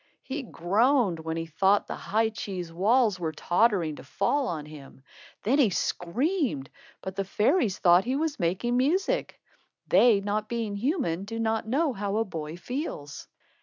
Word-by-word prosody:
He 275 +2 -4
groaned 215 - +1
when 160 0 -4
he 165 - -3
thought 190 +6 +2
the - - -5
high 220 +2 0
cheese 185 -6 -6
walls 210 +2 +2
were 165 -2 -2
tottering 175 -1 +1
to - - -10
fall 265 +7 0
on 155 -3 -4
him. 140 -3 -13 0.4
Then 265 +7 +2
he 250 -7 +5
screamed, 210 - -1 0.3
but 190 0 -5
the 195 - -1
fairies 210 - +1
thought 175 +1 +5
he 255 +2 0
was 300 -1 -1
making 190 +8 0
music. 375 - 0 0.5
They, 210 +2 +5
not 210 +2 -2
being 230 -4 -2
human, 220 - -1
do 225 +2 -5
not 225 -1 -1
know 280 +4 +1
how 205 -1 -2
a 225 - +1
boy 160 -4 -6
feels. 175 - -6
205 Hz, 165 wpm, -27 LUFS, 175-250 Hz, 0.5 s, he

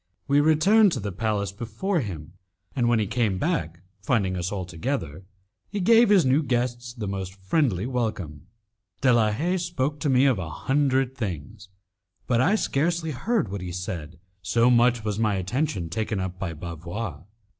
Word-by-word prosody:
We 140 +1 +4
returned 190 +8 +5
to - - -2
the 100 -1 -4
palace 105 0 -1
before 120 - -2
him, 85 - -6 0.4
and 120 -3 +2
when 120 - +3
he 110 - +1
came 110 -2 0
back, 150 - -2 0.2
finding 100 -3 +1
us 90 +1 -3
all 95 -3 -3
together, 90 - -4 0.4
he 205 - -3
gave 230 +4 +5
his 195 -6 +5
new 130 +4 +3
guests 120 -2 -1
the 115 -4 -6
most 95 -1 -4
friendly 100 - 0
welcome. 105 - -3 0.5
De 130 -3 +5
la 110 -2 +3
Haye 170 +12 0
spoke 155 -5 -2
to 145 - 0
me 130 +1 +4
of 130 -8 +3
a 85 -4 -4
hundred 135 - 0
things, 100 - -6 0.6
but 120 -1 +2
I 190 +11 +3
scarcely 165 -2 0
heard 165 - -1
what 100 -2 -4
he 90 -1 -5
said, 85 -2 -5 0.2
so 115 +5 +3
much 120 -1 +4
was 105 0 -2
my 105 -3 +2
attention 95 - -1
taken 105 +4 -2
up 95 -1 -4
by 85 -3 -3
Bavois. 85 +2 -6
115 Hz, 175 wpm, -25 LUFS, 95-140 Hz, 0.6 s, returned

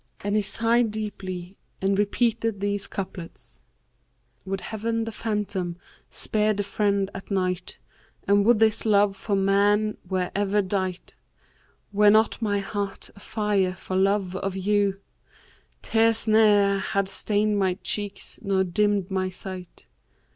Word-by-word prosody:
And 205 +1 -1
he 215 - +3
sighed 230 +3 +2
deeply 195 -4 -6 0.2
and 195 +1 +1
repeated 225 0 0
these 205 0 -2
couplets, 190 -3 -8 0.8
'Would 195 0 -3
Heaven 225 +1 -2
the 225 - -4
Phantom[FN#548] 210 -5 -2 0.3
spared 215 -1 0
the 205 - 0
friend 200 -1 0
at 195 - -9
night 185 -2 -2 0.2
* - - -34
And 200 0 +4
would 235 +2 +5
this 220 0 +3
love 205 -1 +4
for 200 +1 -2
man 205 +2 +2
were 185 -2 -1
ever 205 0 +1
dight! 185 -1 -3 0.8
Were 205 +1 +5
not 220 +3 +3
my 205 -2 +1
heart 200 0 -4
afire 205 -3 -1
for 185 - -6
love 195 -1 +1
of 195 0 -3
you, 200 0 +1 0.4
* - - -32
Tears 225 0 +2
ne'er 205 -2 +4
had 200 0 -1
stained 205 +1 +2
my 190 -2 +1
cheeks 205 -1 -3
nor 195 -1 +1
dimmed 200 +1 0
my 190 -1 0
sight. 185 -1 -9
200 Hz, 140 wpm, -25 LUFS, 190-210 Hz, 0.8 s, would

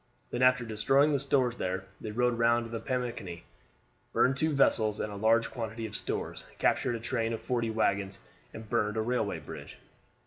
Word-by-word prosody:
Then, 120 - -2
after 125 -1 +4
destroying 135 +7 +3
the 140 - +2
stores 130 -3 +1
there 95 +1 -2 0.2
they 110 - -5
rode 120 +2 +1
round 120 0 +3
to 115 - -9
the 115 -1 -4
Pamunkey, 115 -10 -3 0.7
burned 130 - +3
two 155 +4 +1
vessels 110 -7 +3
and 105 - -3
a - - -6
large 115 +3 +3
quantity 115 -1 -4
of 110 - -6
stores, - - -4
captured 120 - +2
a - - -4
train 115 0 -1
of 110 - -3
forty 120 -2 -1
wagons, 100 -3 0 0.3
and 110 0 -9
burned 105 -1 0
a - - +2
railway 125 +2 0
bridge. - - -9
115 Hz, 185 wpm, -30 LUFS, 110-125 Hz, 0.7 s, after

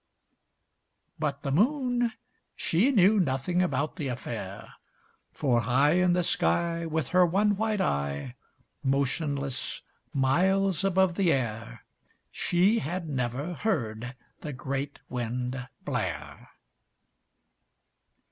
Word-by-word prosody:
But 145 -2 -2
the 140 - -1
Moon, 245 - +2 0.4
she 190 +11 +2
knew 210 -4 +5
nothing 170 +3 +1
about 155 -2 -1
the 150 -6 -2
affair, 125 -1 -6 0.6
For 125 -5 +1
high 130 +6 +3
In 180 0 +3
the 180 0 +2
sky, 170 0 +1
With 160 -4 -2
her 180 0 +5
one 200 +4 +3
white 215 0 0
eye, 70 - -1 0.5
Motionless, 140 0 -1 0.3
miles 185 +7 +2
above 190 -1 +3
the 190 -4 +3
air, 115 - -3 0.5
She 190 +6 +2
had 170 +1 -3
never 135 +4 -2
heard 125 - -2 0.2
the 150 - -6
great 140 +2 -4
Wind 125 +1 -3 0.2
blare. - - -4
155 Hz, 105 wpm, -28 LUFS, 130-185 Hz, 0.6 s, knew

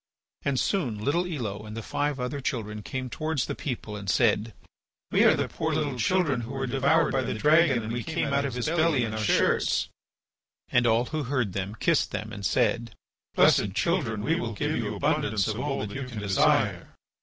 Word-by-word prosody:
And 140 -2 0
soon 140 - 0
little 155 +12 0
Elo, 110 - -4
and 110 +1 -8
the 115 - -5
five 145 +2 -2
other 125 +3 -3
children 105 -4 -3
came 130 +5 -4
towards 155 +1 -2
the - - -3
people 115 -6 -5
and 100 -2 -5
said: 110 0 +2 0.6
"We - - +4
are - - +6
the - - -1
poor - - -2
little 145 -4 -1
children 145 -2 +1
who 120 +3 -7
were 135 0 -2
devoured 135 +5 +2
by 135 - +1
the 125 - -3
dragon 150 0 +4
and 110 +1 -4
we 120 - -2
came 155 +1 -2
out 140 0 +2
of 135 -3 -3
his 125 - -2
belly 160 -5 +2
in 110 -2 -3
our 110 - -3
shirts." 110 - +2 0.8
And 125 -1 +3
all 115 +2 +3
who 155 +1 -3
heard 125 -7 -1
them 100 +2 -3
kissed - - +1
them - - -5
and 100 - -7
said: 120 0 0 0.4
"Blessed 100 -1 +4
children, 125 - 0
we 165 +6 +1
will 115 -1 -3
give 100 - -1
you - - -2
abundance 105 -2 0
of 110 +1 -2
all 135 -5 -2
that 100 - -8
you 135 -1 -4
can 120 -3 -9
desire." 100 -2 +2
125 Hz, 205 wpm, -27 LUFS, 110-145 Hz, 0.8 s, are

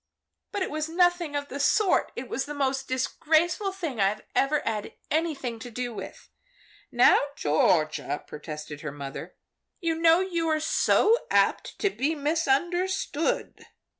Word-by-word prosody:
"But 405 - -1
it - - -4
was 310 +1 -2
nothing 350 -2 +2
of 285 0 -2
the 280 - -5
sort! 390 +7 +2
It 245 - -6
was 260 +3 -2
the 295 +1 -6
most 270 -1 -1
disgraceful 320 - +1
thing 325 - -4
I 200 +2 +2
ever 285 +2 +2
had 215 -2 -3 0.2
anything 295 -7 -1
to 245 - -8
do 245 +1 -4
with." - - -9 0.6
"Now - - +6 0.2
Georgia," 155 0 +1
protested 150 -1 -8
her 150 - -5
mother, 140 -1 -8 0.4
"you 335 -2 0
know 330 +1 +4
you 345 -3 -1
are 310 0 +2
so 420 +7 +3
apt - - +1
to 405 - +2
be 310 -1 -1
misunderstood." 330 +3 -1
295 Hz, 145 wpm, -27 LUFS, 240-335 Hz, 0.6 s, Now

